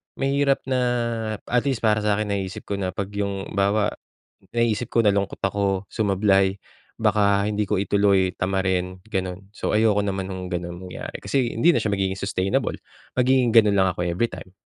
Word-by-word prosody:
mahirap 140 0 +1
na 130 -1 0 0.6
at 125 +1 +1
least 125 -4 -1
para 105 -1 +3
sa 105 -1 +1
akin, 105 -1 -2
naiisip 95 -2 -3
ko 100 0 -4
na 95 0 -3
'pag 100 0 -4
'yong 100 -1 -3
halimbawa, 100 +1 +1 0.6
naiisip 115 0 +1
ko, 115 - +2
nalungkot 100 -1 0
ako, 100 -1 0
sumablay, 100 -2 +2 0.4
baka 100 -2 +2
hindi 105 -1 -1
ko 105 - +1
ituloy, 100 -1 +2
tamarin, 95 -1 -1
gano'n. 95 -2 -4
So, 105 - -2
ayoko 105 -2 +3
naman 95 -1 -3
no'ng 90 -1 -5
gano'n 85 -1 -4
mangyari - - -7
kasi 130 -4 0
hindi 170 0 +3
na - - +1
siya 105 - 0
magiging 95 -1 0
sustainable, 95 -1 -1 0.4
magiging 125 -2 +3
gano'n 105 -3 +5
lang 95 -1 +3
ako 90 0 -3
every 90 +7 0
time. 95 - -10
100 Hz, 170 wpm, -23 LUFS, 95-110 Hz, 0.6 s, gano'n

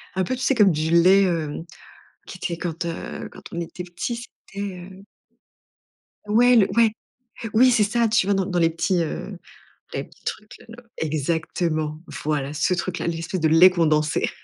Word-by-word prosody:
un 190 - +1
peu, 255 - -2
tu 255 - -8
sais 270 - +2
comme 205 -5 +5
du 155 +1 -1
lait, 185 +3 +6
heu, 165 -4 -1 0.8
qui 185 - -9
était 170 -2 -3
quand, 170 0 -4
heu 165 0 -6
quand - - -14
on 170 - -3
était 180 +2 -7
petit, 180 +7 -4 0.3
c'était, 200 0 -6 0.3
heu 190 +1 -14 1.2
Ouais 245 +3 +5
le 205 - +5
ouais. 225 -2 +5 0.6
Oui, 255 +3 +6
c'est 220 -3 +4
ça! 230 +2 +1
Tu 215 -3 +2
vois, 200 - +2
dans 190 -1 0
dans 180 -2 -1
les 165 -1 +3
petits, 170 +1 0
heu 175 +4 -5 0.6
les - - -2
petits - - -20
trucs-là 230 +2 -8
exactement! 155 0 -2 0.2
Voilà 145 -2 -1
ce 180 +4 +1
truc-là, 180 -1 -3
l'espèce 165 +2 -3
de 160 - +3
lait 165 +4 +7
condensé 155 -4 +1
175 Hz, 175 wpm, -23 LUFS, 160-200 Hz, 1.2 s, lait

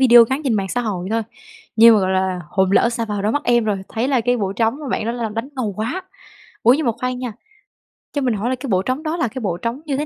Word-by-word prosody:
video 240 -3 +8
ngắn 270 +3 0
trên 240 -5 +1
mạng 195 -2 -1
xã 245 - -1
hội 190 -6 -3
thôi, 225 0 +1 0.5
nhưng 230 0 +8
mà, 210 - +3
gọi 190 0 0
là, 185 -1 0
hồn 190 -1 +1
lỡ 235 - +4
sa 235 -1 -2
vào 205 -2 -3
đôi 215 - +1
mắt 290 - 0
em 240 -2 +3
rồi, 210 -2 0
thấy 235 +4 -2
là 260 -4 +2
cái 245 +2 +1
bộ 195 -4 -2
trống 225 +6 0
mà 285 - -6
bạn 215 - -1
đó 230 - -1
là 235 -2 -3
đánh 225 +5 -4
ngầu 220 -6 -2
quá. 250 - -3 0.6
Ủa, 240 +3 +6
nhưng 300 -1 -1
mà 235 - +3
khoan 250 0 -2
nha, 250 -3 -4 0.8
cho 285 - -1
mình 250 -3 +1
hỏi 215 +4 -2
là 260 - 0
cái 255 +2 -7
bộ 185 -1 +2
trống 255 +8 -2
đó 320 +2 -2
là 250 - +1
cái 255 +4 -6
bộ 180 -5 -2
trống 235 +8 -4
như 275 -2 -1
thế 300 - -1
230 Hz, 300 wpm, -20 LUFS, 210-255 Hz, 0.8 s, video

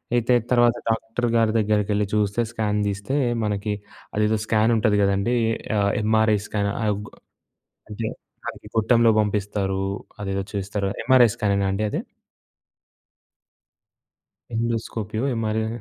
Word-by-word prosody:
అయితే 120 +1 +2 0.2
తర్వాత 120 -1 +4
డాక్టర్ 115 +2 -1
గారి 115 -1 +3
దగ్గరికెళ్లి 105 -1 +1
చూస్తే 105 +1 +1
స్కాన్ 105 -2 -1
తీస్తే, 100 +6 -2 0.3
మనకి 105 0 -1 0.4
అదేదో 105 +1 +2
స్కాన్ 110 +1 +2
ఉంటది 105 -2 +2
కదండీ. 100 +4 +2 0.4
ఆహ్, 100 0 +2
ఎంఆర్ఐ 110 0 +3
స్కాన్ 100 -1 -1 0.2
ఆగొ 105 0 -2 0.8
అంటే, 110 +1 -4 0.4
అదికి - - -10
గుట్టంలో 115 +1 +4
పంపిస్తారు. 100 -2 -1 0.4
అదేదో 100 -1 -2
చేస్తారు. 100 0 -2 0.2
ఎంఆర్ఐ 130 -2 +6
స్కానేనా 100 -3 +1
అండి 100 +2 -1
అది? - - -2 2.5
ఎండోస్కోపియో 115 -1 -2
ఎంఆర్ఐ. 110 -1 -1
105 Hz, 110 wpm, -23 LUFS, 100-115 Hz, 2.5 s, ఎంఆర్ఐ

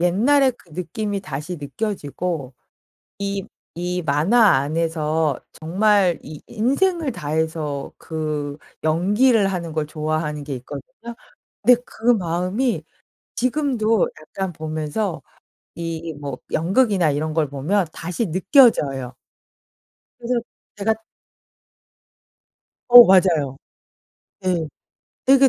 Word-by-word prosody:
옛날의 255 +10 +3
그 - - -23
느낌이 195 +5 -3
다시 155 +1 -5
느껴지고 160 - -4 1.2
이, 180 +1 -3
이 - - -2
만화 170 - +4
안에서 155 0 0 0.2
정말 190 +1 +2
이 150 0 -9
인생을 280 - 0
다해서 155 -3 -3
그 150 -3 -4 0.3
연기를 200 +7 +3
하는 170 -4 -3
걸 155 -1 -1
좋아하는 155 -1 -3
게 140 -1 -4
있거든요. 185 - -9 0.5
근데 245 -1 +6
그 225 - -9
마음이 185 +6 -1 0.5
지금도 245 -5 +1
약간 190 +4 -4
보면서 155 +4 -3 0.5
이 165 -1 -4
뭐 140 -3 -6
연극이나 185 - +2
이런 155 +2 -2
걸 155 -3 +2
보면 170 +8 0
다시 180 +7 -3
느껴져요. 155 - +3 1.1
그래서 240 0 -1 0.4
제가 210 +2 +1 1.9
어, 245 0 +12
맞아요. 170 - +3 0.8
네. 180 -4 0 0.6
되게 270 0 +6
175 Hz, 205 characters per minute, -22 LUFS, 155-220 Hz, 1.9 s, 어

